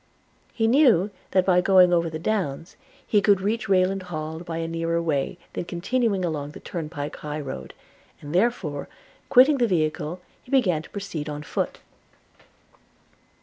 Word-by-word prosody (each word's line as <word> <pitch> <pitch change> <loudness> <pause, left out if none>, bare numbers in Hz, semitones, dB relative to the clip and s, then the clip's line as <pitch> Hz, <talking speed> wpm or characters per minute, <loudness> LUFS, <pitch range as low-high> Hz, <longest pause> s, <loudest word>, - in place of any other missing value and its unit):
He 225 - 0
knew 225 - +4 0.2
that, 185 -1 +2
by 180 -1 +4
going 180 -1 +5
over 170 -1 +2
the 160 - -5
downs, 170 -4 -2 0.3
he 210 - +3
could 200 -2 +4
reach 210 +3 -2
Rayland 190 0 +2
Hall 155 -1 -4
by 170 -1 -5
a 165 0 -2
nearer 165 0 -1
way 160 0 -1 0.2
than - - -4
continuing 200 +2 0
along 150 -3 -3
the - - -10
turnpike 150 -4 -5
high 150 0 -5
road; 140 -3 -7 0.4
and 145 +1 -8
therefore, 180 -8 0 0.4
quitting 270 +2 +6
the 240 - +3
vehicle, 160 -2 -1 0.2
he 270 +2 +2
again 180 -11 +2
proceeded 180 -7 -5
on 150 0 -5
foot. - - -3
175 Hz, 150 wpm, -24 LUFS, 155-200 Hz, 0.4 s, quitting